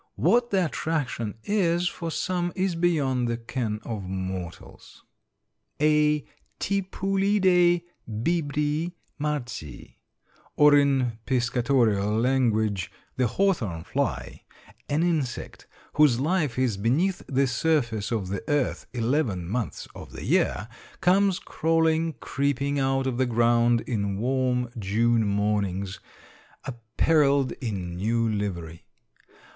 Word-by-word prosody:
What 240 Hz, 0 st, +3 dB
the 190 Hz, -4 st, +2 dB
attraction 145 Hz, -10 st, -2 dB
is 180 Hz, -4 st, +1 dB
for 170 Hz, -1 st, -4 dB
some 175 Hz, +1 st, -1 dB
is 190 Hz, -1 st, 0 dB
beyond 145 Hz, -8 st, +1 dB
the 115 Hz, 0 st, -1 dB
ken 115 Hz, -2 st, -3 dB
of 110 Hz, -3 st, -4 dB
mortals. 95 Hz, -2 st, -7 dB, 0.8 s
A 150 Hz, -1 st, +3 dB, 0.3 s
Tipulidæ 190 Hz, -2 st, +2 dB, 0.3 s
bibri 150 Hz, +6 st, -1 dB, 0.3 s
marci, 145 Hz, -, -5 dB, 0.6 s
or 150 Hz, 0 st, +6 dB
in 135 Hz, -5 st, +2 dB
piscatorial 120 Hz, -5 st, +1 dB
language, 110 Hz, -6 st, +1 dB, 0.3 s
the 125 Hz, -1 st, +2 dB
hawthorn 115 Hz, -, 0 dB
fly, -, -, -3 dB, 0.5 s
an 150 Hz, +3 st, +1 dB
insect 155 Hz, -8 st, -2 dB, 0.3 s
whose 145 Hz, -5 st, +4 dB
life 150 Hz, -3 st, 0 dB
is 125 Hz, -6 st, +1 dB
beneath 145 Hz, -, +1 dB
the 135 Hz, +1 st, +2 dB
surface 120 Hz, -5 st, 0 dB
of 105 Hz, -5 st, -2 dB
the 100 Hz, 0 st, -3 dB
earth 145 Hz, -3 st, 0 dB
eleven 115 Hz, -, 0 dB
months 115 Hz, +3 st, -3 dB
of -, -, -11 dB
the -, -, -7 dB
year, 105 Hz, -, +1 dB, 0.3 s
comes 190 Hz, 0 st, +3 dB
crawling, 160 Hz, -2 st, +1 dB
creeping 140 Hz, 0 st, -1 dB
out 135 Hz, 0 st, +1 dB
of 130 Hz, -2 st, -2 dB
the 130 Hz, -, +2 dB
ground 120 Hz, 0 st, +3 dB
on 100 Hz, -4 st, -1 dB
warm 125 Hz, +1 st, 0 dB
June 110 Hz, +2 st, +2 dB
mornings 100 Hz, -2 st, -1 dB, 0.7 s
appareled 135 Hz, +3 st, +1 dB
in 95 Hz, -7 st, -4 dB
new 115 Hz, +4 st, +1 dB
livery. 90 Hz, -6 st, -4 dB
130 Hz, 110 wpm, -26 LUFS, 110-160 Hz, 0.8 s, or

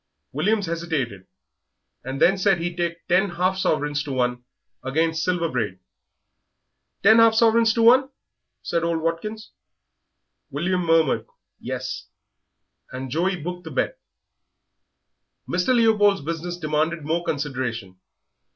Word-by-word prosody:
William 200 Hz, +9 st, +1 dB
hesitated, 160 Hz, -, -3 dB, 0.8 s
and 130 Hz, +2 st, -5 dB
then 195 Hz, -, +5 dB
said 195 Hz, 0 st, +2 dB
he'd 170 Hz, 0 st, -4 dB
take 170 Hz, -1 st, -3 dB
ten 190 Hz, +3 st, +3 dB
half 180 Hz, +2 st, 0 dB
sovereigns 150 Hz, -5 st, 0 dB
to 145 Hz, -1 st, -6 dB
one 125 Hz, -1 st, -1 dB, 0.4 s
against 160 Hz, +4 st, 0 dB
Silver 175 Hz, -1 st, 0 dB
Braid. 110 Hz, -, -2 dB, 1.3 s
"Ten 220 Hz, +3 st, +7 dB
half 225 Hz, -1 st, +6 dB
sovereigns 225 Hz, 0 st, +4 dB
to 230 Hz, -, +2 dB
one?" 260 Hz, +3 st, +6 dB, 0.5 s
said 170 Hz, -, -1 dB
old 170 Hz, -1 st, 0 dB
Watkins. 210 Hz, +7 st, -4 dB, 1.0 s
William 180 Hz, +5 st, -1 dB
murmured 165 Hz, -3 st, +2 dB, 0.3 s
"Yes," -, -, -5 dB, 0.8 s
and 130 Hz, 0 st, -6 dB
Joey 180 Hz, +6 st, +1 dB
booked 180 Hz, +2 st, -6 dB
the -, -, -6 dB
bet. -, -, -2 dB, 1.5 s
Mr. 180 Hz, 0 st, -1 dB
Leopold's 215 Hz, -6 st, +4 dB
business 170 Hz, +3 st, -4 dB
demanded 155 Hz, 0 st, -1 dB
more 165 Hz, +3 st, -1 dB
consideration. 125 Hz, -, -4 dB
170 Hz, 120 wpm, -23 LUFS, 145-190 Hz, 1.5 s, Ten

